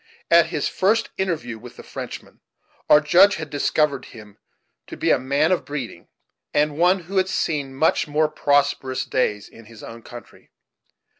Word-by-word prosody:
At 170 -1 +6
his 160 -4 -2
first 215 +4 0
interview 150 -12 -3
with 120 +1 -13
the - - -11
Frenchman, - - -9 0.5
our 150 - +8
Judge 185 +7 +5
had 155 -2 -7
discovered 145 -1 0
him 105 -2 -14 0.5
to - - -9
be - - +1
a - - +3
man 140 +5 +1
of 185 - +1
breeding, 130 -12 -7 0.5
and 150 0 +2
one 180 +2 +3
who 190 +4 -6
had 190 0 +2
seen 145 -7 -2
much 155 +3 +1
more 150 +1 +1
prosperous 140 -3 0
days 105 -5 -1
in 115 - -16
his 115 -1 -14
own 115 0 -10
country. 120 +1 -13
145 Hz, 165 wpm, -22 LUFS, 125-170 Hz, 0.5 s, our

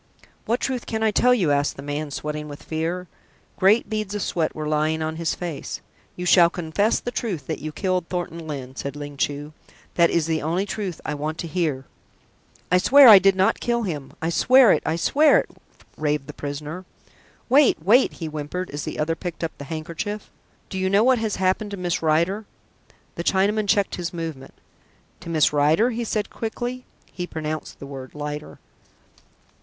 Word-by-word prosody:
"What 235 +3 +1
truth 255 -3 -3
can 220 -1 -2
I 220 - +3
tell 250 +4 +4
you?" 190 -12 +3
asked 145 0 +1
the 135 - -9
man, 145 +1 -3
sweating 150 +2 -4
with 145 0 -10
fear. 170 +3 -3 0.5
Great 200 +5 +4
beads 215 -2 -3
of 205 - -2
sweat 165 -3 -1
were 155 -1 -4
lying 155 +1 0
on 160 0 -3
his 165 -1 -1
face. 170 -5 -5 0.4
"You 180 - -5
shall 175 -1 +6
confess 175 +6 0
the 245 - -5
truth 190 - -3
that - - -4
you 155 +1 -5
killed 185 0 -1
Thornton 170 -2 -4
Lyne," 135 -3 -6
said 140 +1 -5
Ling 145 0 -7
Chu. 145 +2 -2 0.4
"That 170 -1 +4
is 165 -2 +1
the 160 -1 -1
only 170 +6 0
truth 195 -4 -4
I 150 - -2
want 155 +2 -3
to 170 - -4
hear." 155 -5 -1 0.9
"I 180 - +5
swear 275 +7 +8
I 210 -4 +11
did 195 0 +4
not 190 0 +2
kill 235 -1 0
him! 150 -9 -5
I 165 - 0
swear 255 +6 +6
it, - - +3
I 160 - +1
swear 295 - +4
it!" - - -2 0.5
raved 150 -2 -1
the 150 - -9
prisoner. 150 +5 -6 0.6
"Wait, 275 +2 +5
wait!" 215 +11 +4
he 165 - -6
whimpered 155 +4 -5
as 145 +1 -5
the - - -5
other 160 +2 0
picked 175 0 -6
up 165 - -3
the 140 - -7
handkerchief. 170 +7 -5 0.4
"Do 190 - -3
you 190 0 +1
know 200 +3 +4
what 255 -1 +4
has 220 -2 -1
happened 190 +3 0
to 200 - -6
Miss 175 -2 -1
Rider?" 170 +7 +1 0.7
The 170 - -5
Chinaman 205 +3 +1
checked 200 +1 +2
his 175 -1 -3
movement. 160 -6 -6 0.6
"To 175 - -9
Miss 155 -2 +3
Rider?" 155 +11 +3
he 235 0 -3
said 215 -1 -2
quickly. 245 +3 -4 0.3
(He 180 -1 -5
pronounced 155 -1 -5
the - - -9
word 135 -1 -9
"Lider.") 150 0 -6
170 Hz, 190 wpm, -23 LUFS, 150-205 Hz, 0.9 s, I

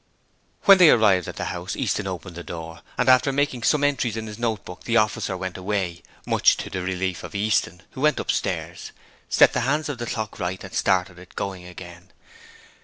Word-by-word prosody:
When 195 -2 +8
they 175 -4 +8
arrived 100 - +4
at - - -6
the - - -4
house - - -5
Easton 100 - -1
opened 90 -2 -6
the 85 - -7
door, 80 -1 -8 0.2
and 125 - +1
after 130 +2 +5
making 135 -3 0
some 145 +5 +2
entries 130 -6 0
in 110 - -4
his 105 0 -8
note 115 -4 -2
book 90 - -10
the 115 0 +2
officer 105 -3 0
went 95 0 -5
away, 95 -3 -2 0.2
much - - +4
to - - -6
the 95 - -3
relief 90 -3 -2
of - - -9
Easton, 100 -3 0
who 130 - -8
went 150 +1 +3
upstairs, - - -3 0.4
set - - +5
the - - +1
hands 150 +5 0
of 135 -4 -4
the 120 - -4
clock 110 -2 -4
right 90 0 -3
and - - -10
started 90 -1 +1
it 90 0 -15
going 95 -3 -4
again. 90 +1 -11
100 Hz, 205 wpm, -24 LUFS, 90-120 Hz, 0.4 s, When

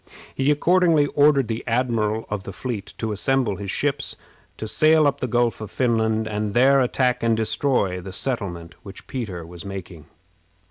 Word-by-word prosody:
He 135 +1 0
accordingly 165 0 +4
ordered 145 -3 +4
the 115 0 -3
admiral 115 -3 0
of 105 -2 -3
the 95 - -8
fleet 105 -1 -6
to 110 -1 -3
assemble 110 0 0
his 100 0 -6
ships, 140 +5 -1 0.4
to 110 - -5
sail 155 +6 +4
up 140 -1 +1
the 125 - -2
Gulf 120 -1 0
of 110 - -6
Finland, 110 -2 0
and 105 -1 -3
there 135 +3 +5
attack 125 0 +1
and 115 -1 +2
destroy 110 -5 0
the 95 +1 -8
settlement 90 -8 -4
which 100 -1 -11
Peter 100 -10 -5
was 85 0 -10
making. 95 -5 -8
115 Hz, 170 wpm, -23 LUFS, 100-135 Hz, 0.4 s, there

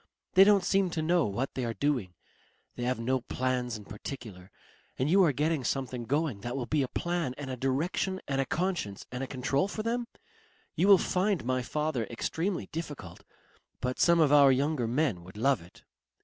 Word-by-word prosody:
They 190 - +9
don't 200 -1 +5
seem 195 0 +2
to 160 -2 -2
know 170 -2 +2
what 120 +7 -3
they 130 - -3
are 115 -1 -2
doing. 120 -8 -1 0.6
They 120 - -3
have 125 -1 0
no 130 +2 0
plans 125 -2 -2
in 105 - -12
particular.... 105 -4 -8 0.5
And 135 +5 0
you 195 +1 +6
are 165 - +4
getting 150 +1 0
something 125 -2 -2
going 145 -5 -1
that 120 +3 -4
will 125 - -2
be 150 +4 +1
a 130 - 0
plan 170 -3 -2
and 140 -2 -5
a - - -3
direction 155 +9 -1
and 135 -1 0
a - - -1
conscience 170 - -2
and 125 +1 -4
a - - -4
control 135 +6 0
for 215 +1 -4
them? 235 +1 -1 0.7
You 190 - +2
will 200 -1 +9
find 185 - 0
my 130 0 0
father 150 -2 -2
extremely 165 - -2
difficult, 145 - -7 0.6
but 125 0 -3
some 170 -1 +5
of 150 -3 +4
our 140 -2 +7
younger 135 -1 +1
men 120 - 0
would 95 +3 -12
love 135 +1 +2
it. 85 +2 -17
135 Hz, 195 wpm, -29 LUFS, 125-165 Hz, 0.7 s, They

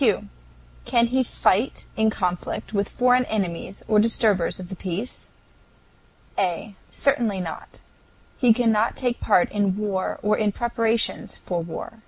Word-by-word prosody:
Can 235 0 +3
he 260 +2 +2
fight 230 -1 +1
in 220 0 +3
conflict 180 0 -3
with 200 -1 0
foreign 250 0 +3
enemies 195 -3 -3
or 215 -1 +4
disturbers 210 -6 +2
of 180 -1 -8
the 190 - -6
peace? 190 +6 -5 1.1
A. 195 +3 -1 0.2
Certainly 235 -8 +1
not. 165 -3 -8 0.6
He 245 -3 +5
cannot 225 -1 +2
take 245 -2 0
any - - -12
part 195 -5 +3
in 200 -2 0
war 200 -3 -2
or 210 +1 +3
in 210 -2 +1
preparations 230 0 0
for 175 -2 -3
war. 170 +7 -7
215 Hz, 140 wpm, -24 LUFS, 190-235 Hz, 1.1 s, He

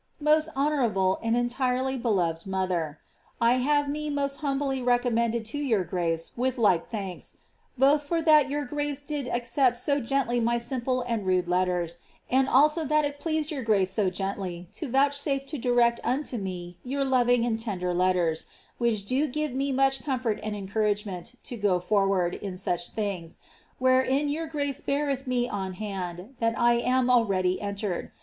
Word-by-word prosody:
•*Mo8t 305 +1 +4
honourable 240 -10 +1
and 230 +1 +1
entirely 255 +2 0
beloved 185 -9 0
mother,! 180 -5 -1 0.4
have 255 +5 +3
me 300 +1 -3
mo9t 280 -1 -1
htimbly 275 -3 -1
recommended 235 -2 +1
to 240 +7 -5
yonr 215 - +1
grace 165 -2 -2
with 255 +1 -1
like 190 -8 +2
thanks, 195 -5 -6 0.4
Icth 285 +2 +4
for 335 +3 0
that 305 -3 +5
yoiir 290 -1 -3
grace 290 0 -3
did 285 -3 -3
accept 245 +1 +1
so 280 +3 +1
gently 245 -1 0
my 235 +1 +1
simple 255 +1 -1
and 230 -5 -2
rude 185 -1 +2
letteris 180 -1 0 0.3
and 265 +1 +3
also 300 +5 +4
that 305 0 +2
it 285 0 -4
ploatfed 315 -1 -1
your 285 -3 -3
grace 200 -5 +2
so 195 -1 +1
gently 185 -2 -4
to 310 - -5
vouchsufe 275 +1 +1
to 300 - -5
direct 240 -1 +3
unto 255 +1 -1
me 180 -2 -6
your 275 +2 -1
loving 245 -2 +3
and 225 -2 -1
tender 185 -6 -2
letters, 175 -3 +1 0.3
which 225 -4 +1
do 265 +8 +1
give 300 0 -2
me 275 +2 -1
much 270 -1 +2
comfort 250 -6 -1
and 215 -1 -3
encouragement 205 0 -2
to 245 - -6
go 200 -5 +1
forward 195 -1 +1
in 195 -3 -6
such 175 -2 -1
things, 195 -6 -4 0.4
wherein 260 +3 +2
your 320 +3 -2
grace 285 -3 -2
beareth 280 -2 -1
me 245 -1 +1
on 190 -4 -4
hand 185 +1 -6
that 230 -1 0
I 240 0 +4
am 250 +1 +2
already 195 -6 +2
entrre<l. 200 -3 -3
240 Hz, 165 wpm, -27 LUFS, 195-275 Hz, 0.4 s, that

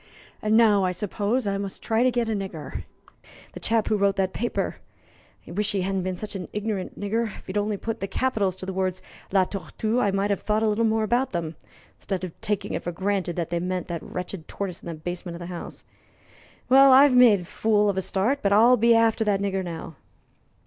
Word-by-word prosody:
And 215 +1 +3
now 210 -4 +5
I 185 - +1
suppose 210 +5 -1
I 195 -1 -1
must 200 -1 -6
try 225 0 +1
to 255 - +4
get 240 -2 0
a - - -1
nigger 190 -7 -5 0.7
the - - -8
chap 225 -1 +1
who 215 - +2
wrote 200 -1 +2
that 190 -1 0
paper. 240 +2 -2 0.7
I - - -9
wish 210 +4 0
he 195 - 0
hadn't 195 0 -1
been 185 0 -3
such 210 +2 -6
an 185 -2 -5
ignorant 210 -3 -3
nigger. 225 +3 0
If - - -15
he'd 185 - -7
only 205 0 0
have - - -12
put 225 0 -3
the 195 - -3
capitals 200 -3 0
to 190 - -8
the 190 - -4
words 185 0 -2 0.3
'La 190 -1 +4
Tortue,' 215 +5 -2
I 205 - +2
might 195 +1 0
have 200 - -1
thought 215 +1 0
a - - +3
little 215 +2 +1
more 220 0 +2
about 240 +5 0
them, 165 -2 -3 0.4
instead 190 -2 -4
of 180 -3 -7
taking 205 -2 -2
it - - -2
for 175 - -4
granted 190 -1 -1
that 170 -2 -3
they 170 - 0
meant 180 +1 -3
that 170 -2 -3
wretched 180 -2 -6
tortoise 190 -3 -5
in - - -11
the 170 - -4
basement 175 +2 -6
of - - -8
the 175 - -7
house. 170 - -8 0.8
Well, 270 +1 +7
I've 270 +1 +7
made 235 -6 +6
a - - -9
fool 210 +3 +1
of 200 - +1
a 190 - 0
start, 210 +10 0
but 200 - +1
I'll 235 +5 +6
be 235 +1 +5
after 225 0 +3
that 205 -2 +2
nigger 195 -1 -1
now." 165 -3 -7
200 Hz, 230 wpm, -25 LUFS, 185-220 Hz, 0.8 s, Well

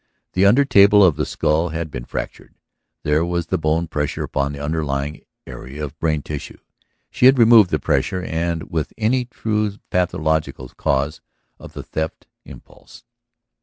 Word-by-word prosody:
The 95 +2 +4
under 130 +8 +5
table 100 -4 +6
of 90 -6 +4
the 75 - -2
skull 80 +3 0
had 80 -1 -4
been - - -6
fractured; - - -7 0.5
there 75 +2 +2
was 85 -1 -2
the 80 - -2
bone 80 +2 0
pressure 75 -1 -3
upon 70 0 -2
the 70 - -8
underlying 75 -1 -3 0.2
area 65 +4 -7
of 75 +2 -11
brain 75 -3 0
tissue. 75 -2 -7 0.5
She 125 - +4
had 135 +1 +6
removed 115 -5 +7
the 75 - +1
pressure 75 +5 -1
and 85 -1 -2
with 80 -2 -2
it - - -47
any 120 +3 +1
true 105 -3 -2
pathological 80 -7 -1
cause 70 +2 -1 0.4
of - - -12
the - - -7
theft 80 0 -5 0.2
impulse. - - -15
80 Hz, 165 wpm, -20 LUFS, 75-95 Hz, 0.5 s, removed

